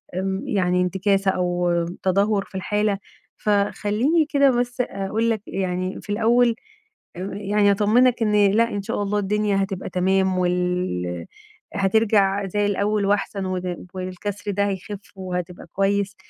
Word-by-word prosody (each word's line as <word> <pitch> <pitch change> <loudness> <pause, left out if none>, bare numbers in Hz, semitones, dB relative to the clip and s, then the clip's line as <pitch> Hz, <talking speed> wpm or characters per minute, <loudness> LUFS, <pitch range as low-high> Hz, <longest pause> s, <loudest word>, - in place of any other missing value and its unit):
إمم، 190 +1 -2
يعني 180 -3 +1
إنتكاسة 195 +1 +1
أو 175 -1 0 0.3
تدهور 200 +2 +2
في 195 - -17
الحالة، 210 +1 0 0.4
فخلّيني 210 +9 +1
كده 280 -2 +4
بس 245 +1 -1
أقول 215 +1 -1
لك 220 -3 0
يعني 185 0 -3
في - - -17
الأول، 235 +2 +3 0.6
أم 185 +2 -5
يعني 205 0 +2
أطمنك 230 +4 +3
إن 210 -1 +4
لأ 230 +2 +3
إن 200 -1 -3
شاء 205 - -2
الله 205 +1 0
الدنيا 205 0 +1
هتبقى 195 -1 -4
تمام، 190 +1 +1
وال 180 - -1 0.5
هترجع 200 -1 +2
زي 205 +2 0
الأول 205 0 0
وأحسن 200 -1 0
وإن 180 -1 -4
وإن 185 0 -4
الكسر 205 +2 -5
ده 200 +1 +1
هيخف 195 +1 -5 0.2
وهتبقى 180 -2 -5
كويس، 200 0 0
200 Hz, 140 wpm, -23 LUFS, 185-210 Hz, 0.6 s, كده